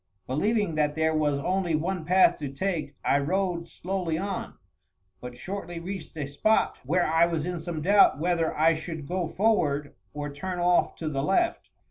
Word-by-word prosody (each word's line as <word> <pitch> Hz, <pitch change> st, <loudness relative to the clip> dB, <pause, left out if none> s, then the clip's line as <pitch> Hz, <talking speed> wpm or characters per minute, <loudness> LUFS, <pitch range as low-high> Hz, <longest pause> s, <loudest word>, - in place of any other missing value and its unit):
Believing 205 Hz, -, 0 dB
that 150 Hz, -1 st, +1 dB
there 160 Hz, 0 st, +1 dB
was 150 Hz, -2 st, +1 dB
only 180 Hz, +2 st, 0 dB
one 170 Hz, +2 st, -2 dB
path 185 Hz, +3 st, +4 dB
to 145 Hz, -3 st, -4 dB
take, 150 Hz, -2 st, -3 dB
I 140 Hz, -, +3 dB
rode 175 Hz, +2 st, -1 dB
slowly 180 Hz, -3 st, -3 dB
on, 195 Hz, +2 st, -4 dB, 0.6 s
but 125 Hz, 0 st, -9 dB
shortly 175 Hz, +2 st, -6 dB
reached 180 Hz, -1 st, -7 dB
a 150 Hz, -, -2 dB
spot 145 Hz, +11 st, +1 dB
where 175 Hz, +7 st, +1 dB
I 165 Hz, +1 st, +4 dB
was 165 Hz, -3 st, -2 dB
in 180 Hz, -1 st, -3 dB
some 160 Hz, -2 st, -5 dB
doubt 200 Hz, -4 st, +5 dB
whether 165 Hz, 0 st, +1 dB
I 160 Hz, +2 st, +5 dB
should 160 Hz, -1 st, -6 dB
go 180 Hz, -1 st, -1 dB
forward 160 Hz, -8 st, +1 dB, 0.2 s
or 145 Hz, 0 st, -4 dB
turn 185 Hz, +5 st, -4 dB
off 175 Hz, 0 st, +2 dB
to 160 Hz, -, -5 dB
the 140 Hz, -3 st, -1 dB
left. 335 Hz, -, 0 dB
165 Hz, 175 wpm, -27 LUFS, 150-185 Hz, 0.6 s, doubt